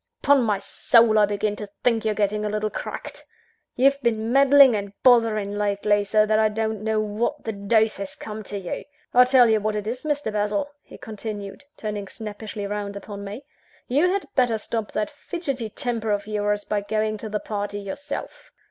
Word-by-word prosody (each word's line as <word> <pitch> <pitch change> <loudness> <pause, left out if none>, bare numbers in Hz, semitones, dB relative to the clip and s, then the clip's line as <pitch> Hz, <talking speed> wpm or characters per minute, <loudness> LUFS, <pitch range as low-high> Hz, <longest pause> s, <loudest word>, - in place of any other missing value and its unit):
Upon 285 -1 +5
my 215 -4 +1
soul 220 +2 +4
I 210 - +5
begin 205 0 -1
to 210 -2 -7
think 230 -3 +2
you're 215 -1 0
getting 210 0 0
a 210 - -1
little 210 0 -2
cracked. - - -6 0.5
You've 275 +2 +3
been 225 -2 0
meddling 275 -2 +7
and 200 -1 -4
bothering 225 -5 +4
lately, 205 0 +1
so 215 +1 +3
that 215 0 +2
I 215 0 +4
don't 220 0 -2
know 220 0 +1
what 215 +2 -2
the 225 - -2
deuce 215 +2 +1
has 195 -1 -5
come 215 0 -7
to 205 - -5
you! 185 -3 -5 0.3
I'll 250 0 +7
tell 255 -2 +6
you 220 -1 +3
what 215 +1 -1
it 210 -1 -3
is, 240 +4 -4
Mr. 290 -7 -1
Basil," 210 +6 -1
he - - -14
continued, 210 +1 -7
turning 210 -2 -4
snappishly 210 0 -6
round 205 0 -4
upon 200 0 -8
me, 210 +8 -8 0.4
"you 295 +8 +3
had 395 0 -1
better 245 -4 +2
stop 220 0 -3
that 215 +6 -1
fidgetty 285 -6 -4
temper 230 -1 -3
of 205 -1 0
yours, 205 -1 -1
by 210 -1 -1
going 215 +1 -1
to 220 - -6
the 210 0 -2
party 205 -1 -4
yourself. 280 +9 -6
215 Hz, 190 wpm, -24 LUFS, 205-235 Hz, 0.5 s, meddling